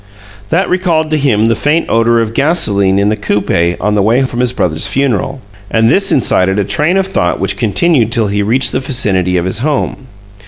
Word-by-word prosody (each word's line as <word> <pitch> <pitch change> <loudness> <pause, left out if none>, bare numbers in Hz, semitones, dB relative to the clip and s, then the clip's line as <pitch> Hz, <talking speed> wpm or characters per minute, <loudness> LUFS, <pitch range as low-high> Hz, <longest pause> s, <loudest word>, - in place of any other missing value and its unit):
That 180 +4 0
recalled 170 -4 -1
to 155 - +1
him 110 -7 +1
the 115 0 +1
faint 150 +8 0
odor 115 +1 +2
of 110 -1 -3
gasolene 105 - +1
in 100 +1 +1
the 110 - 0
coupe 95 -5 -1
on 105 +2 -1
the 105 - +1
way 115 +6 +2
from 125 -2 -4
his 125 -1 +1
brother's 80 -10 -1
funeral, 135 0 -2 0.3
and 115 +2 +2
this 195 0 +1
incited 95 -6 +1
a 105 - +1
train 155 - 0
of 195 - +1
thought 90 - -1
which 95 - -1
continued 115 - +1
till 115 -2 +1
he 100 0 -1
reached 120 +6 +2
the - - -1
vicinity 95 -9 0
of 85 - -1
his 95 - -2
home. 140 -1 -3
115 Hz, 205 wpm, -12 LUFS, 100-140 Hz, 0.3 s, odor